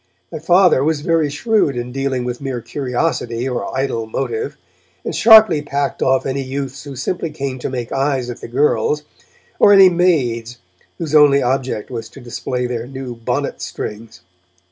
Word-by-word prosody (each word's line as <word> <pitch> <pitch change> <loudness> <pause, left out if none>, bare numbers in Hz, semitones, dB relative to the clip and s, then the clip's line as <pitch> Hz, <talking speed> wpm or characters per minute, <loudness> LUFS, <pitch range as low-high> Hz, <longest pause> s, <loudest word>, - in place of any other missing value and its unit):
My 160 - -5
Father 175 -3 +4
was 155 0 0
very 165 -1 +1
shrewd 155 - +1
in 120 +1 -4
dealing 135 -1 -2
with 125 +1 -4
mere 135 -3 -3
curiosity 125 -2 -2
or 130 0 -3
idle 130 -4 -2
motive, 440 - -3 0.5
and - - -3
sharply 220 -8 +7
packed 140 -1 -3
off 130 0 +2
any 135 +1 -2
youths 135 +1 -5
who 140 -1 -8
simply 165 +6 -3
came 140 -4 -5
to - - -4
make 125 -3 -5
eyes 135 -2 0
at 120 - -7
the - - -7
girls, 150 - +1 0.6
or 205 - +6
any 195 -2 +8
'maids' 125 -10 0 0.4
whose 160 -3 -5
only 145 -2 +6
object 130 -3 -2
was 115 -2 -6
to 140 - -13
display 125 0 -4
their 120 -1 -4
new 130 -2 -7
bonnet 115 -1 -3
strings. 110 +1 -7
135 Hz, 165 wpm, -18 LUFS, 125-155 Hz, 0.6 s, any